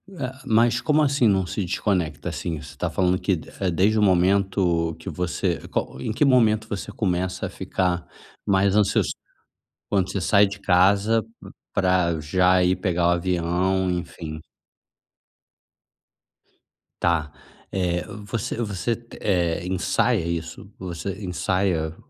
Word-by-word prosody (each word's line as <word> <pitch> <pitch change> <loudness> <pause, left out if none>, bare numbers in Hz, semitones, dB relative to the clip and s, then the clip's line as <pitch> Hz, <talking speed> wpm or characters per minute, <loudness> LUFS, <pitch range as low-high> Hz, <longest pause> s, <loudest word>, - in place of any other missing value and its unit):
Ah, 130 -4 -5
mas 115 +2 +3
como 155 0 +2
assim 140 -4 +3
não 95 -3 +2
se 95 +2 -3
desconecta? 85 -5 -1
Assim, 80 -4 -4
você 75 - -10
está - - -3
falando 90 -1 +1
que 95 - +1
de 80 - -9
é 95 - +2
desde 100 +6 +2
o - - +2
momento 95 -3 +2
que - - -7
você 90 -1 -1
qual - - -3
em 70 - -3
que 130 - +1
momento 110 -5 +3
você 105 0 -4
começa 90 -3 -1
a - - -7
ficar 90 -2 -2 0.4
mais 95 0 +3
ansioso 105 -2 +2 0.8
quando 95 -3 +1
você 100 - -2
sai 100 +2 +4
de 100 +1 -7
casa 100 +4 +3 0.5
pra 90 -3 +2
já 90 +4 +3
ir 90 +1 +3
pegar 90 -2 0
o - - +5
avião? 90 +1 0
Enfim. 80 -3 -5 2.6
Tá, 80 -4 +1 0.4
eh, 90 -2 0 0.2
você 110 +1 -3
você, 115 0 -1 0.3
eh, 85 -4 +1
ensaia 95 +2 +1
isso? 85 +4 -5
Você 95 +3 -5
ensaia 90 -3 -1
95 Hz, 135 wpm, -24 LUFS, 85-100 Hz, 2.6 s, o